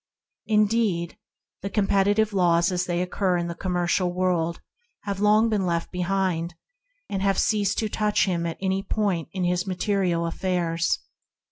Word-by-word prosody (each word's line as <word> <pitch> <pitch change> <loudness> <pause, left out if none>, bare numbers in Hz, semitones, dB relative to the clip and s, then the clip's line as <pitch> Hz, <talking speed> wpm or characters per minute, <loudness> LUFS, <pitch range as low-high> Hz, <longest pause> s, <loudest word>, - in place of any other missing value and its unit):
Indeed, 210 -5 +1 0.5
the 200 - -4
com 205 0 +1
petitive 205 +2 +2
laws, 175 -2 +3
as 180 0 0
they 175 0 0
obtain 180 -1 0
in 170 - -3
the 170 - -4
com 185 +1 -4
mercial 175 +1 +1
world, 175 -2 0 0.4
have 200 -2 -4
here 210 +2 +4
been 215 -3 0
long - - -1
left 170 -1 -1
behind, 180 -2 -1 0.5
and 195 - -3
have 195 0 +1
ceased 205 -2 +1
to 220 - 0
touch 210 0 +1
him 170 -3 -1
at 165 - -5
any 190 0 0
point 195 -4 -1
in 185 -1 -3
his 180 +2 0
material 185 -2 0
affairs. 170 -1 0
185 Hz, 165 wpm, -25 LUFS, 175-200 Hz, 0.5 s, here